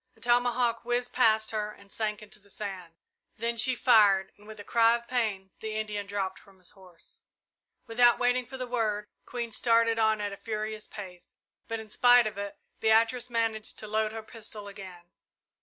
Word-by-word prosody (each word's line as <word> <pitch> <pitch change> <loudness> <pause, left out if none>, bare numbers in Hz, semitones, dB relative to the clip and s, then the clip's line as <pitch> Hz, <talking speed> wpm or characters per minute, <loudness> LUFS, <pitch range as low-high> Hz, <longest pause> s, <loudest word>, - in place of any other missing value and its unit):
A - - -24
tomahawk 240 0 +1
whizzed 245 +1 -1
past 220 -3 +3
her 210 -1 -2
and 200 -1 -17
sank 215 -1 -3
into 210 0 -11
the 200 0 -22
sand. 185 -5 -7 0.4
Then 235 +1 -1
she 245 +3 +3
fired, 205 -6 +4
and 205 +1 -19
with 215 -1 -10
a - - -7
cry 230 +2 +4
of 235 0 -7
pain, 210 -6 -1
the 220 0 -5
Indian 210 -2 -3
dropped 195 -2 -3
from 195 -1 -21
his 180 -1 -13
horse. 185 -3 -14 0.6
Without 240 +1 +4
waiting 245 0 +1
for 265 +1 -8
the 255 - -4
word, 220 -4 -1 0.2
Queen 235 -2 -4
started 230 0 +3
on 220 -1 +3
at 205 -1 -3
a - - -8
furious 215 0 -5
pace, 185 -4 -10 0.3
but 225 0 -3
in 220 -1 -11
spite 245 0 +6
of 215 -2 -4
it, 200 0 -5 0.2
Beatrice 230 +3 +3
managed 225 -2 -1
to 215 - -6
load 215 0 0
her 220 0 -7
pistol 215 -2 -10
again. 185 -3 -11
220 Hz, 190 wpm, -28 LUFS, 205-235 Hz, 0.6 s, spite